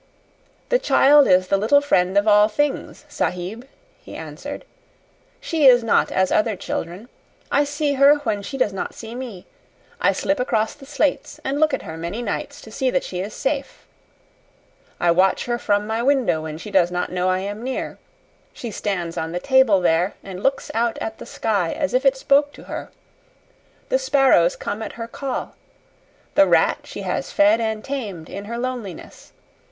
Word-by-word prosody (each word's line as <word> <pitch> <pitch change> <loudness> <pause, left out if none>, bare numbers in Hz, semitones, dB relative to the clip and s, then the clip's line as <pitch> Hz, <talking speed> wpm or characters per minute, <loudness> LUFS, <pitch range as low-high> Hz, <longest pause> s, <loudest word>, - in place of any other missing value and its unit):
"The - - +3
child 290 - +5
is 185 0 +3
the 195 - +3
little 220 +8 +4
friend 190 -9 +1
of 205 +2 +3
all 210 0 +6
things, 290 +6 -2
Sahib," 190 +8 -3 0.3
he - - -11
answered. - - -8 0.7
"She 315 -5 +2
is 245 -2 +7
not 225 - +2
as 190 0 +1
other 215 0 +2
children. 180 +4 -5 0.4
I 290 +1 +3
see 290 0 -1
her 280 +2 +6
when 205 -1 -1
she 235 +7 -6
does 210 -6 +1
not 190 - -5
see 225 0 -8
me. 240 -7 -7 0.6
I - - +4
slip 290 -2 -1
across 225 -3 0
the 275 -2 -15
slates 290 0 -1
and 275 +2 -1
look 310 0 +3
at - - -3
her 160 0 -7
many 175 +8 -4
nights 205 - -4
to 220 - -12
see 260 +3 0
that 265 +1 0
she 180 - -5
is 200 +3 -5
safe. 275 0 -3 1.1
I 175 - +3
watch 185 +3 +2
her 240 0 -2
from 205 -1 +1
my 220 +2 -2
window 255 - +2
when 155 -1 -6
she 205 +6 -9
does 185 -3 +4
not 180 0 -3
know 180 0 0
I 185 - +2
am 205 +2 -5
near. 260 +1 -4 0.5
She 235 - -7
stands 180 -5 -3
on 160 +1 -3
the 175 - -2
table 260 -6 +4
there 175 +2 +1
and 190 -1 -8
looks 270 +3 -1
out 230 0 0
at 220 0 -5
the - - -9
sky 200 -7 -1
as 285 -3 -2
if 260 +2 +3
it 270 0 +3
spoke 285 +2 +2
to - - -13
her. - - -7 1.0
The - - +2
sparrows 270 - +3
come 205 +2 -5
at 220 - -5
her 230 -1 -6
call. 265 +2 -5 0.8
The 295 0 +5
rat - - +3
she - - -8
has - - -3
fed 300 -6 +4
and 220 -1 -2
tamed 210 - -5
in 200 +1 -6
her 235 +3 -5
loneliness. 240 -8 -6
225 Hz, 185 wpm, -22 LUFS, 190-270 Hz, 1.1 s, is